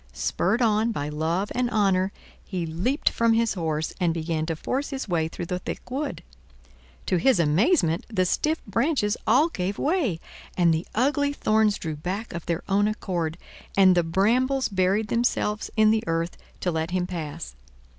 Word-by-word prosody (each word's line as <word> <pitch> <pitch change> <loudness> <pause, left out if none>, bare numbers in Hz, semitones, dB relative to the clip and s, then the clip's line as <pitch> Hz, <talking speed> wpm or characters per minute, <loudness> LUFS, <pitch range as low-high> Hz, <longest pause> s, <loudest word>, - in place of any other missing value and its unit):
Spurred 205 - 0
on 220 +1 +2
by 145 -8 -3
love 165 +6 -1
and 250 0 0
honor, 195 -3 +2 0.3
he 180 -4 -3
leaped 185 - -2
from 230 -1 +3
his 230 0 +2
horse 160 -4 -2
and 170 -3 +1
began 160 -1 -2
to 165 - -1
force 265 - -2
his 270 -3 -4
way 165 -4 0
through 170 +1 -6
the 180 +1 -3
thick 215 - -7
wood. 280 +2 -3 0.8
To 185 - +1
his 250 +2 +3
amazement 170 - +2
the 185 -4 +1
stiff 310 - 0
branches 225 - +1
all 275 +9 +5
gave 195 - -3
way, 290 - 0 0.4
and 170 -2 +4
the 160 +2 -2
ugly 285 +4 +2
thorns 215 -5 +2
drew 160 -2 -4
back 190 +9 -4
of 170 -1 -6
their 170 0 -1
own 205 +1 +3
accord, 175 -6 -2 0.4
and 190 -1 +7
the 175 - +4
brambles 240 +11 +1
buried 195 +2 +1
themselves 225 -3 0
in 215 0 +6
the 220 0 +1
earth 165 +1 -1 0.3
to 180 - 0
let 160 0 -2
him 180 0 0
pass. 150 - -6
195 Hz, 175 wpm, -25 LUFS, 170-230 Hz, 0.8 s, and